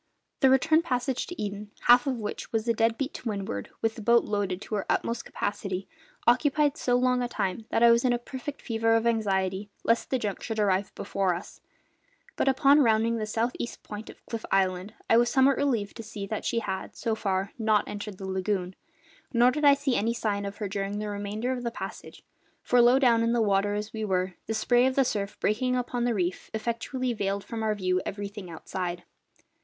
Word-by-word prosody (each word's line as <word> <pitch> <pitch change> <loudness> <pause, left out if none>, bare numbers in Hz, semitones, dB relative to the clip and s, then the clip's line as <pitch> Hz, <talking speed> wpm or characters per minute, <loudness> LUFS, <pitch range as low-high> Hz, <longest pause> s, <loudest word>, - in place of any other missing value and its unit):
The 265 - +5
return 315 +5 +4
passage 255 -4 -1
to 355 - -8
Eden 205 0 -4
half 245 +2 +6
of 265 - +1
which 210 -2 -5
was 225 0 -1
a 230 - +3
dead 225 0 +1
beat 275 0 -3
to 235 - -5
windward, 195 - -4
with 225 0 +2
the 225 - -9
boat 235 +2 +4
loaded 200 -3 -1
to - - -8
her 205 - -1
utmost 230 0 -1
capacity 195 -2 -3 0.4
occupied 290 +4 +3
so 245 -4 +1
long 250 0 +2
a 245 - 0
time 220 -2 -3
that 230 - +2
I 235 - +8
was 235 0 +4
in 255 - +3
a 240 - +2
perfect 260 +3 -7
fever 225 -1 +2
of 225 0 +1
anxiety 200 -3 0
lest 230 +1 +1
the 260 - +1
junk 210 -5 -3
should 225 -2 -4
arrive 200 -2 +1
before 190 -3 0
us; 175 - -9 0.7
but - - 0
upon 275 +2 +5
rounding 230 -1 +3
the 215 -1 -3
south 230 +3 0
east 235 - -5
point 210 +1 -8
of - - -14
Cliff 230 -2 -5
Island 190 +2 +1
I 225 - +5
was 240 0 +4
somewhat 265 +1 +4
relieved 235 -8 0
to - - -5
see 205 -2 -6
that 215 +1 -4
she 230 -1 0
had, 190 -3 -5
so 225 - -1
far, 195 -2 -1
not 215 -2 +2
entered 205 -1 -6
the 195 - -7
lagoon, 190 -1 -1 0.6
nor 245 0 +5
did 300 +2 -1
I 285 -1 +8
see 280 -3 0
any 230 +3 +1
sign 205 -3 -1
of 200 +1 -7
her 210 - -3
during 195 +1 -3
the 210 0 -3
remainder 205 +4 -3
of 255 -1 -2
the 235 - 0
passage; 230 - -8 0.4
for, 245 0 +4
low 240 +2 +6
down 240 -4 +4
in 230 +1 +2
the 240 - +2
water 205 0 +2
as 210 +1 -4
we 220 -1 -3
were, 185 -2 0
the 225 - -1
spray 245 +3 +3
of 260 - -1
the 270 - +4
surf 205 -3 -3
breaking 250 +4 +1
upon 245 -1 -1
the 240 -2 +1
reef 180 -2 -2
effectually 235 +3 -2
veiled 200 -2 -2
from 225 +2 -5
our 215 -1 +1
view 185 -2 0
everything 200 -1 -6
outside. 175 +1 -5
220 Hz, 215 wpm, -27 LUFS, 200-245 Hz, 0.7 s, I